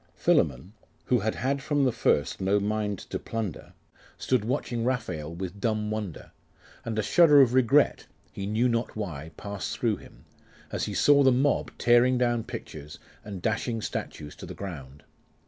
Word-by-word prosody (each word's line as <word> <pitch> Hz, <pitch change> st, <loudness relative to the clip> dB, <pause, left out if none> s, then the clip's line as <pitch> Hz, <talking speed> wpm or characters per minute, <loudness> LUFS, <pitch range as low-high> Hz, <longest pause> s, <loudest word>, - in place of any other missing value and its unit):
Philammon, 75 Hz, +5 st, +1 dB, 0.3 s
who 125 Hz, -, +2 dB
had 110 Hz, +1 st, -1 dB
had 135 Hz, +2 st, -1 dB
from 145 Hz, 0 st, +1 dB
the 130 Hz, -, +3 dB
first 95 Hz, -11 st, 0 dB
no 100 Hz, +2 st, +2 dB
mind 105 Hz, 0 st, -1 dB
to -, -, -6 dB
plunder, 110 Hz, -7 st, -5 dB, 0.4 s
stood 130 Hz, -5 st, 0 dB
watching 120 Hz, 0 st, -2 dB
Raphael 90 Hz, -, -2 dB
with 95 Hz, +3 st, -6 dB
dumb 110 Hz, -2 st, 0 dB
wonder; 105 Hz, -7 st, -5 dB, 0.5 s
and 110 Hz, -1 st, -4 dB
a 110 Hz, -, +1 dB
shudder 150 Hz, -, +6 dB
of 125 Hz, -3 st, +5 dB
regret, 130 Hz, +3 st, +3 dB, 0.2 s
he 100 Hz, -, -5 dB
knew 110 Hz, +4 st, +2 dB
not 115 Hz, 0 st, -1 dB
why, 80 Hz, -8 st, -5 dB
passed 100 Hz, -1 st, -5 dB
through 115 Hz, -4 st, +1 dB
him, -, -, -16 dB, 0.5 s
as -, -, -2 dB
he -, -, -5 dB
Saw 145 Hz, -1 st, +5 dB
the 135 Hz, -1 st, +6 dB
mob 135 Hz, +3 st, +1 dB
tearing 120 Hz, +2 st, +4 dB
down 120 Hz, -2 st, +1 dB
pictures, 75 Hz, 0 st, -8 dB, 0.3 s
and 100 Hz, -4 st, -8 dB
dashing 115 Hz, +1 st, -1 dB
statues 75 Hz, -7 st, -5 dB
to -, -, -9 dB
the -, -, -8 dB
ground. 75 Hz, -7 st, -8 dB
110 Hz, 165 wpm, -27 LUFS, 95-125 Hz, 0.5 s, shudder